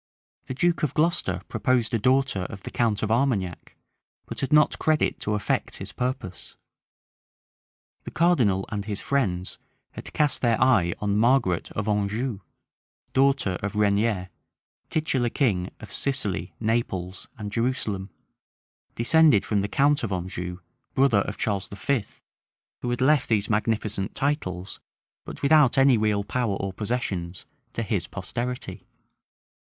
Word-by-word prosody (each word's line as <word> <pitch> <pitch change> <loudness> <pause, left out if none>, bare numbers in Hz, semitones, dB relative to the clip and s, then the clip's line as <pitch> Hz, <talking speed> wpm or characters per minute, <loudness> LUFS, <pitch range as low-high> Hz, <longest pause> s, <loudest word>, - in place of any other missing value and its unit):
The 130 - -4
duke 170 +5 +1
of 150 -5 -1
Glocester 150 - +1
proposed 125 -3 +1
a 115 - +2
daughter 130 -5 +2
of 95 +1 -8
the - - -7
count 110 -4 0
of 110 - 0
Armagnac; 110 - 0 0.5
but - - -6
had 135 - -2
not 150 0 +4
credit 155 -1 +1
to 105 - -1
effect 105 - -1
his - - -7
purpose. 125 -8 -4 1.5
The - - -5
cardinal 120 - +2
and 100 -2 -4
his 105 -2 -3
friends 95 -10 -1 0.3
had - - -9
cast 150 -2 +1
their 115 -3 +2
eye 105 -10 +3
on 105 -1 0
Margaret 115 -7 +2
of 105 0 -3
Anjou, 105 +2 -1 0.7
daughter 135 -9 +2
of 105 0 -3
Regnier, 105 -2 +1 0.6
titular 135 -6 0
king 100 -10 0
of 110 - -10
Sicily, 100 - -2
Naples, 100 -5 -2
and 105 -1 -6
Jerusalem, 110 -5 -1 0.9
descended 145 -2 +4
from 105 -2 +1
the 100 - -1
count 145 +6 +2
of 110 - -3
Anjou, 90 0 -4 0.3
brother 130 -7 +4
of 105 - -5
Charles 100 -3 -1
V., 105 +3 -1 0.8
who 120 - -2
had 120 0 -2
left 140 0 +3
these 105 -2 +1
magnificent 105 -2 -1
titles, 100 - -2 0.5
but - - -9
without 145 -3 +5
any 135 -1 +6
real 105 -2 +1
power 115 -1 -1
or 95 -1 -4
possessions, 95 -5 -3 0.3
to 115 - -2
his 100 -5 -2
posterity. 120 +6 -5
110 Hz, 140 wpm, -25 LUFS, 100-130 Hz, 1.5 s, any